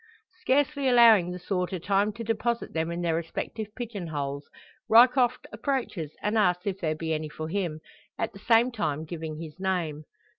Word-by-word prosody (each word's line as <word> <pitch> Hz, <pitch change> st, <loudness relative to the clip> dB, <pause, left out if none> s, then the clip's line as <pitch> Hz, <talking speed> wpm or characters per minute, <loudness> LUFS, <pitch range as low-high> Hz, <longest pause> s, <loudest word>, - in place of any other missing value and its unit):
Scarcely 280 Hz, -2 st, +1 dB
allowing 230 Hz, -7 st, +6 dB
the 180 Hz, -, -5 dB
sorter 180 Hz, 0 st, -2 dB
time 200 Hz, +4 st, +1 dB
to 230 Hz, -, -6 dB
deposit 230 Hz, +1 st, -1 dB
them 160 Hz, 0 st, -1 dB
in 170 Hz, +1 st, -3 dB
their 170 Hz, -1 st, +1 dB
respective 170 Hz, +6 st, -4 dB
pigeon 215 Hz, -7 st, -5 dB
boles, 140 Hz, -1 st, -4 dB, 0.4 s
Ryecroft 250 Hz, +2 st, +5 dB
approaches 225 Hz, -, -3 dB
and 215 Hz, +1 st, +1 dB
asks 180 Hz, -3 st, +2 dB
if 195 Hz, -2 st, -2 dB
there 155 Hz, -2 st, -1 dB
be 160 Hz, 0 st, -2 dB
any 155 Hz, 0 st, -3 dB
for 155 Hz, +1 st, -6 dB
him 170 Hz, -4 st, -2 dB, 0.4 s
at 225 Hz, -, -2 dB
the 195 Hz, -, -12 dB
same 235 Hz, +4 st, +4 dB
time 160 Hz, -9 st, -2 dB
giving 160 Hz, -1 st, -6 dB
his 160 Hz, +1 st, -9 dB
name. 170 Hz, -6 st, -2 dB
185 Hz, 175 wpm, -27 LUFS, 160-230 Hz, 0.4 s, allowing